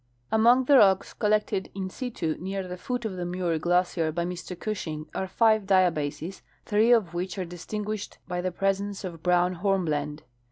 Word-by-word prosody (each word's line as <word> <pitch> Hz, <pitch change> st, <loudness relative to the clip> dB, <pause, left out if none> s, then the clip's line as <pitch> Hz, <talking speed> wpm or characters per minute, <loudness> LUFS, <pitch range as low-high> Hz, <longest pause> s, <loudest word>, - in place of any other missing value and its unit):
Among 235 Hz, +4 st, +5 dB
the 275 Hz, +1 st, +6 dB
rocks 195 Hz, -2 st, +4 dB
collected 210 Hz, -3 st, 0 dB
in 190 Hz, -1 st, -4 dB
situ 185 Hz, -12 st, -3 dB
near 190 Hz, +1 st, -4 dB
the 180 Hz, -, -5 dB
foot 245 Hz, +5 st, -4 dB
of 195 Hz, -4 st, -3 dB
the 180 Hz, -, -3 dB
Muir 175 Hz, -2 st, -1 dB
glacier 175 Hz, -1 st, +1 dB
by 170 Hz, +2 st, -2 dB
Mr 180 Hz, 0 st, -6 dB
Gushing 160 Hz, -7 st, -4 dB
are 190 Hz, -, -2 dB
five 220 Hz, 0 st, +3 dB
diabases, 175 Hz, -3 st, +1 dB, 0.2 s
three 220 Hz, +3 st, +3 dB
of 210 Hz, -8 st, +3 dB
which 180 Hz, +2 st, -3 dB
are 185 Hz, -, -2 dB
dis 175 Hz, 0 st, -10 dB
tinguished 210 Hz, -1 st, -4 dB
by 180 Hz, -1 st, -2 dB
the 185 Hz, 0 st, -1 dB
presence 195 Hz, +2 st, -1 dB
of 170 Hz, -4 st, -6 dB
brown 180 Hz, 0 st, +2 dB
hornblende. 155 Hz, -7 st, 0 dB
185 Hz, 175 wpm, -27 LUFS, 175-205 Hz, 0.2 s, the